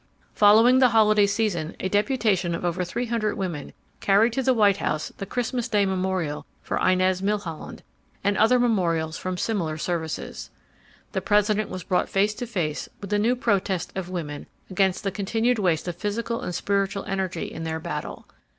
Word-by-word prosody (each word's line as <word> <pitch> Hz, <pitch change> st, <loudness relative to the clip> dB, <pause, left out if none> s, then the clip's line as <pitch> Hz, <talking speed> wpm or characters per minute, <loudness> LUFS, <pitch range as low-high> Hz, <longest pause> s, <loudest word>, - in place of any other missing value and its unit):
Following 225 Hz, +5 st, +6 dB
the 255 Hz, -1 st, +6 dB
holiday 215 Hz, -2 st, +4 dB
season 195 Hz, -6 st, -1 dB
a -, -, -1 dB
deputation 205 Hz, -4 st, +1 dB
of 175 Hz, -, -4 dB
over 175 Hz, +1 st, 0 dB
three 235 Hz, +8 st, -3 dB
hundred 225 Hz, -3 st, -1 dB
women 175 Hz, -7 st, -4 dB, 0.3 s
carried 210 Hz, +4 st, +3 dB
to 270 Hz, -, 0 dB
the 260 Hz, 0 st, +3 dB
White 205 Hz, -3 st, +4 dB
House 155 Hz, -5 st, -2 dB
the 195 Hz, -, -6 dB
Christmas 245 Hz, 0 st, -2 dB
Day 205 Hz, -2 st, +3 dB
memorial 185 Hz, -5 st, -2 dB, 0.2 s
for -, -, -2 dB
Inez 185 Hz, 0 st, +2 dB
Milholland 200 Hz, -5 st, -3 dB, 0.4 s
and 200 Hz, +1 st, +2 dB
other 240 Hz, +5 st, +4 dB
memorials 170 Hz, -10 st, +1 dB
from 185 Hz, -1 st, -3 dB
similar 175 Hz, -8 st, -1 dB
services. 160 Hz, -1 st, -4 dB, 0.6 s
The -, -, -2 dB
President 210 Hz, 0 st, +2 dB
was 185 Hz, -2 st, -6 dB
brought 180 Hz, -, 0 dB
face 205 Hz, +2 st, +2 dB
to 245 Hz, +3 st, -6 dB
face 170 Hz, -10 st, -3 dB
with 200 Hz, 0 st, -8 dB
the 205 Hz, -, +2 dB
new 235 Hz, +4 st, +2 dB
protest 200 Hz, -7 st, 0 dB
of 190 Hz, -2 st, -4 dB
women 155 Hz, -5 st, -5 dB, 0.2 s
against 190 Hz, 0 st, +1 dB
the 195 Hz, -, -1 dB
continued 225 Hz, +5 st, 0 dB
waste 175 Hz, -4 st, +1 dB
of 175 Hz, -1 st, -4 dB
physical 230 Hz, +4 st, -2 dB
and 180 Hz, -, -4 dB
spiritual 200 Hz, 0 st, 0 dB
energy 190 Hz, -3 st, -2 dB
in 165 Hz, -, -6 dB
their 160 Hz, 0 st, -3 dB
battle. 150 Hz, -1 st, -6 dB
195 Hz, 175 wpm, -25 LUFS, 175-215 Hz, 0.6 s, Following